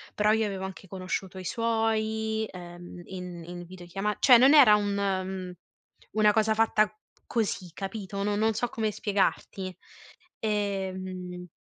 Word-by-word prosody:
però 210 0 +3
io 220 0 +2
avevo 195 -2 -4
anche 190 0 -9
conosciuto 185 0 -4
i 185 - -7
suoi, 220 0 0
ehm, 175 0 -10
in 180 -2 -7
in 175 0 -8
videochiama 185 +3 -4
cioè 250 -3 +8
non 270 +5 +7
era 260 -8 +9
un 205 -1 0
mhmm, 190 -2 -2 0.6
una 210 0 +4
cosa 220 0 +2
fatta 215 -1 +3 0.4
così 205 -6 -1
capito? 195 +1 -5
No 205 0 0
non 220 +2 +2
so 245 - 0
come 220 -1 -1
spiegarti. 195 -2 -1 0.6
Ehm 185 -4 -3
200 Hz, 140 wpm, -28 LUFS, 185-220 Hz, 0.6 s, era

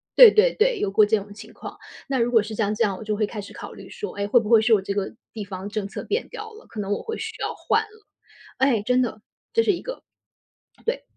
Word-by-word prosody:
对 - - +11
对 455 +4 +4
对， 455 0 +3
有 200 - 0
过 210 +1 +6
这 220 +1 +3
种 205 0 -8
情 215 +1 -12
况， - - -9 0.3
那 275 - 0
如 235 +1 +1
果 230 -3 +6
是 215 +1 -6
像 210 -1 0
这 225 +2 +1
样， 195 - -1
我 220 - -8
就 215 0 -1
会 215 - +2
开 210 0 -6
始 200 - -11
考 - - -8
虑 - - -12
说： 435 -3 -6
“诶？ 200 0 -1
会 240 +4 +5
不 215 - -5
会 230 -2 +7
是 225 +1 +4
我 205 - +5
这 195 +1 -3
个 200 -1 -2 0.2
地 215 - -5
方 190 0 -6
政 210 -1 -3
策 - - -6
变 440 +4 -2
掉 - - -7
了？” 435 - -14
可 220 - -7
能 200 -1 -3
我 - - -3
会 450 0 -5
需 445 0 -5
要 - - -1
换 440 - +1
了。 430 -1 -18 0.5
唉， 260 -5 +3
真 250 +4 +2
的， 220 -3 -2 0.3
这 455 - +4
是 415 - +4
一 355 - -3
个 - - -7 0.8
对。 475 +2 -1
225 Hz, 295 characters per minute, -24 LUFS, -, 0.8 s, 对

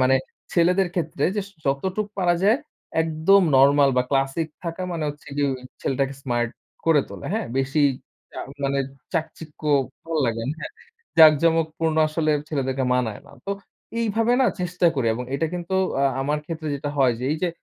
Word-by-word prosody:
মানে 130 +1 +5 0.4
ছেলেদের 180 +2 +3
ক্ষেত্রে 160 -3 -1
যে - - +2 0.2
যতটুকু 190 +10 -1
পারা 175 -2 +3
যায় 220 +7 +4 0.4
একদম 165 +5 +4
নরমাল 140 +1 +6
বা, 125 - +4
ক্লাসিক 135 +4 0 0.2
থাকা 170 +2 -4
মানে 160 -2 -2
হচ্ছে 145 +1 -9
গিয়ে 145 -1 +2 0.3
ছেলেটাকে 135 +1 0
স্মার্ট 120 -2 0 0.4
করে 160 -3 +5
তোলে। - - -8
হ্যা? 220 +1 0 0.2
বেশি 140 +3 +1 0.5
চা - - -8 0.3
মানে 140 0 +1 0.3
চাকচিক্য 160 -2 -4 0.4
ভালো 165 -1 -2
লাগেনা 115 +5 -2
হ্যা, - - -4 0.5
জাকজমক 160 +1 +6
পূর্ণ 160 -1 0
আসলে 155 0 0 0.2
ছেলেদেরকে 135 -3 -1
মানায় 115 -5 -1
না। - - -15
তো - - -2 0.5
এইভাবে 225 +1 +1
না? 255 - +5
চেষ্টা 180 0 +1
করি 130 -5 0
এবং 125 +2 -4
এটা 160 +3 +1
কিন্তু 175 +1 -3 0.3
আ - - +4 0.2
আমার 150 +2 0
ক্ষেত্রে 160 -2 -4
যেটা 145 +1 -3
হয় 130 -3 +4
যে - - -3
এই - - -1
যে 180 - +2
155 Hz, 165 wpm, -24 LUFS, 135-170 Hz, 0.5 s, নরমাল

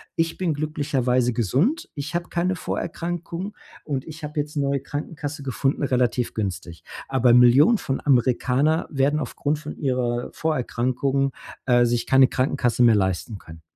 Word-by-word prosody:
Ich 165 -1 -1
bin 175 -4 0
glücklicherweise 135 -5 0
gesund. 135 - 0
Ich 145 +3 -5
habe 175 0 -2
keine 180 +2 0
Vorerkrankungen. 175 +3 -4 0.3
Und 135 -3 -3
ich 160 0 -10
habe 150 0 -4
jetzt 150 +1 -4
'ne 140 - +1
neue 140 0 0
Krankenkasse 145 +1 -6
gefunden, 135 +1 -1
relativ 125 -3 0
günstig. 90 -5 -4 0.2
Aber 130 -2 +3
Millionen 130 - +6
von 135 - -2
Amerikaner 130 +4 +2
werden 145 +1 +1
aufgrund 145 +2 -2
von 150 - -8
ihrer 125 -3 -1
Vorerkrankung, 135 -2 -1 0.3
äh, 120 -1 +4
sich 120 0 0
keine 135 0 +5
Krankenkasse 125 -2 +1
mehr 115 -2 +6
leisten 95 +2 -1
können. 80 -2 -13
135 Hz, 150 wpm, -23 LUFS, 125-155 Hz, 0.3 s, Millionen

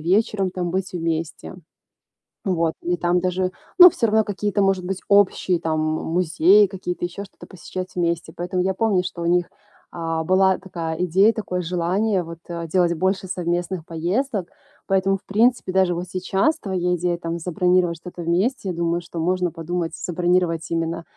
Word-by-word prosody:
вечером 195 +3 +1
там 180 -1 -3
быть 190 +1 -2
вместе. 165 -1 -3 0.9
Вот. 165 -4 +1
И 175 +1 -1
там 175 +1 +1
даже 185 0 0 0.3
ну 360 -1 +11
всё 235 - 0
равно 220 0 +3
какие-то, 205 0 -1
может 195 -2 +2
быть, 190 0 -3
общие, 190 -3 +3
там, 155 -1 -1
м, 155 0 -1
музеи, 180 +4 +4
какие-то 180 -2 -5
еще 180 +3 -6
что-то 195 - -15
посещать 185 0 -7
вместе. 170 -2 -1
Поэтому 180 +1 -2
я 190 +1 0
помню, 200 -3 +1
что 180 -1 -6
у - - -2
них, 175 0 +2 0.4
а, 165 -1 -2
была 190 +2 +3
такая 170 -4 -5
идея, 195 +6 +4
такое 195 -5 -3
желание, 180 +3 0
вот, 165 0 -9
а, 170 -1 -4
делать 175 +1 +2
больше 190 +3 0
совместных 175 -1 -2
поездок. 185 - -2 0.4
Поэтому, 195 0 +2
в - - -29
принципе, 230 0 +2
даже 185 -2 +3
вот 175 +1 -4
сейчас 190 - 0
твоя 180 - -1
идея, 175 0 -1
там, 170 0 -4
забронировать 180 0 +1
что-то 175 +2 -9
вместе, 190 +5 0
думаю, 170 0 -1
что 170 0 -8
можно 180 +1 0
подумать, 170 0 -3
забронировать 175 -1 0
именно 165 0 -2
180 Hz, 165 wpm, -22 LUFS, 170-190 Hz, 0.9 s, ну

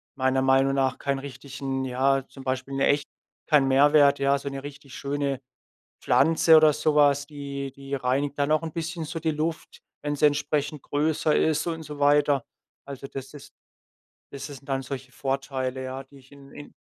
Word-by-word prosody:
meiner 130 0 +1
Meinung 135 +1 +3
nach 130 -1 +1
keinen 140 -1 -2
richtigen, 135 0 -5
ja, 130 +1 +1
zum 135 - -12
Beispiel 130 +1 -3
'n 135 - -2
echt 145 +1 +2 0.4
keinen 145 -4 +4
Mehrwert, 145 +1 +5
ja, 140 0 +3
so 140 - -8
'ne 135 -1 -5
richtig 140 -1 -10
schöne 140 -1 -2 0.6
Pflanze 160 0 +5
oder 155 -1 +6
so 150 +1 0
was, 145 -1 +4
die 140 -2 -6
die 140 +1 -7
reinigt 140 +2 -1
dann 145 +1 +1
auch 155 - +2
'n 160 - -5
bisschen 165 0 -4
so 165 +2 -5
die 160 0 0
Luft, 160 +2 -4 0.2
wenn 145 0 -2
sie 150 - 0
entsprechend 145 0 0
größer 150 +1 +1
ist 160 0 +1
und 165 -1 -3
so 150 -1 -9
weiter. 145 -2 +3 0.4
Also, 140 -1 -7
das 135 +1 -8
ist 145 - -12 0.8
das 140 0 -8
ist 145 - -6
das 140 - -8
sind 135 - -19
dann 135 0 0
solche 130 0 -7
Vorteile, 135 0 -3
ja, 130 +1 -5
die 140 +1 -17
ich 130 +1 -22
in 140 -1 -15
in 145 - -11
140 Hz, 190 wpm, -26 LUFS, 135-150 Hz, 0.8 s, oder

